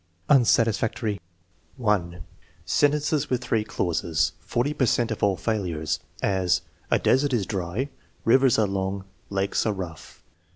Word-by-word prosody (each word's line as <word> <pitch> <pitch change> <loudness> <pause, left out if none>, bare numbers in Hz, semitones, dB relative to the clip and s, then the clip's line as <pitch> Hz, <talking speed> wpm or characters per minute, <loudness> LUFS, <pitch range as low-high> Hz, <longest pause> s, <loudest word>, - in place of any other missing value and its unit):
Unsatisfactory: 115 -4 +2 0.6
(1) 90 -8 0 0.4
Sentences 150 0 +2
with 125 -1 0
three 115 -3 +1
clauses 85 -5 0
(40 130 +5 -1
per 135 -4 +1
cent 115 0 +1
of 110 - -4
all 100 -2 +2
failures); 90 -8 -1 0.2
as: 95 -3 +1 0.3
"A - - +4
desert 135 0 +2
is 110 -5 +1
dry, 95 +6 -2 0.4
rivers 130 +2 +5
are 110 - +4
long, 95 0 -2 0.2
lakes 100 0 0
are 110 - +1
rough." 90 -4 -8
105 Hz, 130 wpm, -25 LUFS, 95-125 Hz, 0.6 s, rivers